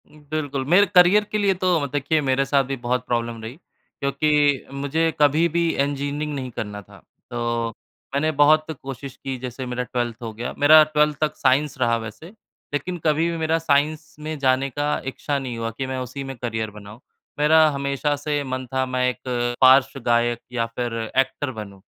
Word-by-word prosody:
उम, 150 Hz, +1 st, -18 dB
बिल्कुल 145 Hz, -3 st, -2 dB
मेरे 200 Hz, +3 st, +7 dB
करियर 180 Hz, +4 st, +7 dB
के 215 Hz, -, 0 dB
लिए 200 Hz, -2 st, +2 dB
तो 180 Hz, -3 st, +3 dB
म -, -, -1 dB
देखिए 145 Hz, +3 st, +1 dB
मेरे 135 Hz, -1 st, +1 dB
साथ 140 Hz, 0 st, +2 dB
भी 135 Hz, +1 st, -4 dB
बहुत 125 Hz, +1 st, 0 dB
प्रॉब्लम 115 Hz, -1 st, -2 dB
रही, 115 Hz, +3 st, -7 dB, 0.4 s
क्योंकि 145 Hz, 0 st, +2 dB
मुझे 145 Hz, +4 st, 0 dB
कभी 150 Hz, +3 st, +4 dB
भी 170 Hz, +1 st, +1 dB
इंजीनियरिंग 145 Hz, +2 st, -2 dB
नहीं 130 Hz, -2 st, -5 dB
करना 105 Hz, -2 st, -5 dB
था। 100 Hz, -, -17 dB, 0.3 s
तो, 120 Hz, -1 st, -2 dB, 0.4 s
मैंने 155 Hz, +3 st, +1 dB
बहुत 155 Hz, +1 st, +4 dB, 0.2 s
कोशिश 135 Hz, 0 st, -7 dB
की 135 Hz, -1 st, -3 dB
जैसे 125 Hz, +1 st, -6 dB
मेरा 125 Hz, 0 st, -3 dB
12th 120 Hz, -2 st, -3 dB
हो 115 Hz, -2 st, -5 dB
गया 120 Hz, +3 st, -5 dB
मेरा 155 Hz, +2 st, +8 dB
12th 150 Hz, -1 st, +1 dB
तक 155 Hz, -, 0 dB
साइंस 145 Hz, +2 st, +1 dB
रहा 120 Hz, -2 st, +2 dB
वैसे, 115 Hz, +8 st, -8 dB, 0.5 s
लेकिन 175 Hz, +5 st, -2 dB
कभी 160 Hz, +2 st, +2 dB
भी 165 Hz, -, -3 dB
मेरा 160 Hz, 0 st, +1 dB
साइंस 150 Hz, 0 st, 0 dB
में 155 Hz, +1 st, -5 dB
जाने 135 Hz, 0 st, +2 dB
का 145 Hz, +2 st, -2 dB
इच्छा 140 Hz, +2 st, -2 dB
नहीं 125 Hz, -3 st, -5 dB
हुआ 115 Hz, 0 st, -3 dB
कि 135 Hz, -, -2 dB
मैं 130 Hz, 0 st, -3 dB
उसी 130 Hz, +2 st, -5 dB
में 135 Hz, 0 st, -6 dB
करियर 110 Hz, -2 st, -3 dB
बनाऊँ। 105 Hz, +2 st, -12 dB, 0.4 s
मेरा 155 Hz, +1 st, +6 dB
हमेशा 140 Hz, +1 st, -1 dB
से 145 Hz, 0 st, -2 dB
मन 130 Hz, -1 st, -4 dB
था 130 Hz, 0 st, +1 dB
मैं 130 Hz, 0 st, 0 dB
एक 125 Hz, -, -6 dB, 0.4 s
पार्श्व 130 Hz, 0 st, +6 dB
गायक 120 Hz, 0 st, +2 dB
या 115 Hz, -2 st, 0 dB
फिर 115 Hz, +1 st, -4 dB, 0.2 s
एक्टर 135 Hz, +1 st, +1 dB
बनूँ, 100 Hz, -4 st, -9 dB
140 Hz, 190 wpm, -23 LUFS, 125-150 Hz, 0.5 s, मेरा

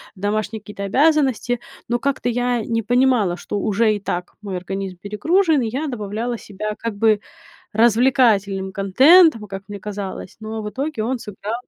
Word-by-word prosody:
домашние 210 Hz, +2 st, -2 dB
какие-то 205 Hz, -1 st, -8 dB
обязанности, 260 Hz, 0 st, +2 dB, 0.3 s
но 240 Hz, 0 st, 0 dB
как-то 275 Hz, -2 st, -1 dB
я 245 Hz, -1 st, 0 dB
не 230 Hz, +1 st, -1 dB
понимала, 245 Hz, -5 st, +2 dB
что 200 Hz, +3 st, -4 dB
уже 215 Hz, +2 st, +2 dB
и 205 Hz, -, -4 dB
так 180 Hz, -2 st, -4 dB
мой 195 Hz, -3 st, -4 dB
организм 190 Hz, +1 st, -5 dB
перегружен, 305 Hz, -, +1 dB
и 230 Hz, -, -1 dB
я 280 Hz, +7 st, -3 dB
добавляла 230 Hz, 0 st, -3 dB
себя 210 Hz, +1 st, -5 dB
как 230 Hz, -2 st, -4 dB
бы 215 Hz, 0 st, +3 dB, 0.5 s
развлекательным 220 Hz, -4 st, +3 dB
контентом, 230 Hz, -, +5 dB
как 195 Hz, 0 st, -7 dB
мне 205 Hz, -1 st, -6 dB
казалось, 200 Hz, -2 st, -6 dB
но 220 Hz, 0 st, -5 dB
в 210 Hz, -, -5 dB
итоге, 275 Hz, -1 st, -3 dB
он 250 Hz, +2 st, -1 dB
сыграл 210 Hz, 0 st, -6 dB
215 Hz, 160 wpm, -21 LUFS, 200-245 Hz, 0.5 s, контентом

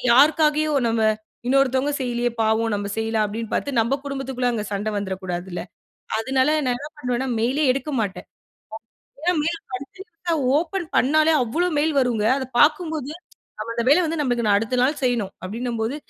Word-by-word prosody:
யாருக்காகவோ 305 Hz, +2 st, +4 dB, 0.2 s
நம்ம 225 Hz, 0 st, +1 dB, 0.4 s
இன்னொருத்தங்க 270 Hz, +1 st, +2 dB
செய்யல்லயே! 240 Hz, -1 st, 0 dB
பாவம்! 220 Hz, 0 st, +1 dB
நம்ம 200 Hz, 0 st, -2 dB
செய்யலாம் 225 Hz, -1 st, 0 dB
அப்பிடின்னு 225 Hz, +2 st, -5 dB
பார்த்து 280 Hz, -4 st, -1 dB
நம்ம 260 Hz, +5 st, 0 dB
குடும்பத்துக்குள்ள 270 Hz, -3 st, -2 dB
அங்க 215 Hz, -3 st, -2 dB
சண்ட 200 Hz, +2 st, -2 dB
வந்துறக்கூடாதுல்ல. 185 Hz, -2 st, -4 dB, 0.6 s
அதனால 260 Hz, +4 st, +1 dB, 0.2 s
நான் 245 Hz, -, +1 dB
என்ன 290 Hz, +4 st, -8 dB
பண்ணுவேன்னா, 250 Hz, 0 st, -1 dB
மெயில் 245 Hz, +5 st, 0 dB
லே 305 Hz, -, +3 dB
எடுக்க 275 Hz, +3 st, -4 dB
மாட்டேன். 200 Hz, -3 st, -4 dB, 0.9 s
ஏன்னா 355 Hz, +2 st, +1 dB
மெயில் 345 Hz, +5 st, -1 dB
படிச்சிட்டுதான் 340 Hz, +3 st, -4 dB, 0.2 s
ஓப்பன் 345 Hz, +1 st, -3 dB
பண்ணாலே 310 Hz, +4 st, +4 dB
அவ்ளோ 330 Hz, +10 st, 0 dB
மெயில் 310 Hz, 0 st, +1 dB
வருங்க. 230 Hz, -4 st, 0 dB
அத 260 Hz, -, -4 dB
பார்க்கும்போது 310 Hz, -2 st, +2 dB, 0.5 s
நம்ம 230 Hz, -, -4 dB
அந்த 235 Hz, -, 0 dB
வேலை 300 Hz, +6 st, +6 dB
வந்து 325 Hz, +1 st, -2 dB
நம்மளுக்கு 245 Hz, -5 st, 0 dB
நான் 200 Hz, -, +5 dB
அடுத்த 225 Hz, +3 st, -2 dB
நாள் 280 Hz, +4 st, +2 dB
செய்யணும் 240 Hz, -6 st, 0 dB
அப்பிடின்னம்போது 230 Hz, +4 st, -3 dB
255 Hz, 155 wpm, -23 LUFS, 225-300 Hz, 0.9 s, வேலை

